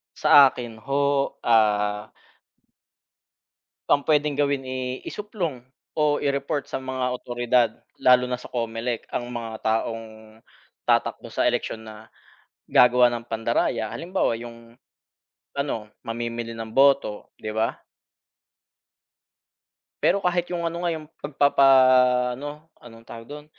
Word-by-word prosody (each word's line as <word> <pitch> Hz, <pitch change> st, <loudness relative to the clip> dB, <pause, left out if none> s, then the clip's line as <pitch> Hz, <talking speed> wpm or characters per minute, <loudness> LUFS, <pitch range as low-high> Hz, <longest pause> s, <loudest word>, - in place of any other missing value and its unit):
sa 140 Hz, -2 st, +7 dB
akin 120 Hz, -4 st, -7 dB
ho, 140 Hz, +1 st, 0 dB
ah. 105 Hz, -2 st, +2 dB, 1.8 s
Ang 145 Hz, -, +4 dB
pwedeng 150 Hz, -1 st, +3 dB
gawin, 140 Hz, -1 st, 0 dB
eh, 130 Hz, 0 st, -5 dB
isuplong 180 Hz, -, -4 dB, 0.3 s
o 150 Hz, -1 st, +2 dB
i-report 140 Hz, 0 st, -2 dB
sa 135 Hz, -, -5 dB
mga 130 Hz, -1 st, -4 dB
awtoridad, 120 Hz, -1 st, +1 dB, 0.3 s
lalo 125 Hz, 0 st, +5 dB
na 125 Hz, 0 st, -4 dB
sa -, -, -11 dB
COMELEC 115 Hz, 0 st, -3 dB
ang 120 Hz, 0 st, -3 dB
mga 115 Hz, -2 st, -6 dB
taong 115 Hz, +1 st, -1 dB, 0.8 s
tatakbo -, -, +1 dB
sa -, -, -1 dB
eleksyon 110 Hz, 0 st, -1 dB
na 110 Hz, 0 st, -12 dB, 0.6 s
gagawa 125 Hz, 0 st, +6 dB
ng 120 Hz, -1 st, -5 dB
pandaraya, 115 Hz, -1 st, -1 dB
halimbawa 170 Hz, -9 st, -1 dB
yung, 115 Hz, 0 st, -12 dB, 0.8 s
ano 140 Hz, -7 st, -3 dB, 0.2 s
mamimili 115 Hz, 0 st, -4 dB
ng 115 Hz, -1 st, -7 dB
boto, 135 Hz, -6 st, +3 dB
'di 110 Hz, 0 st, -6 dB
ba? 110 Hz, +1 st, +1 dB, 2.3 s
Pero 200 Hz, -, +3 dB
kahit 175 Hz, -1 st, 0 dB
yung 170 Hz, -1 st, -2 dB
ano 170 Hz, +1 st, -4 dB
nga, 170 Hz, -, +1 dB
yung 155 Hz, -1 st, -5 dB, 0.2 s
'pag 145 Hz, 0 st, -6 dB
papa-ano, 130 Hz, +1 st, +4 dB, 0.2 s
anong 115 Hz, -1 st, -14 dB
tawag 115 Hz, 0 st, -10 dB
dun, 150 Hz, +2 st, -9 dB
125 Hz, 120 wpm, -24 LUFS, 115-140 Hz, 2.3 s, sa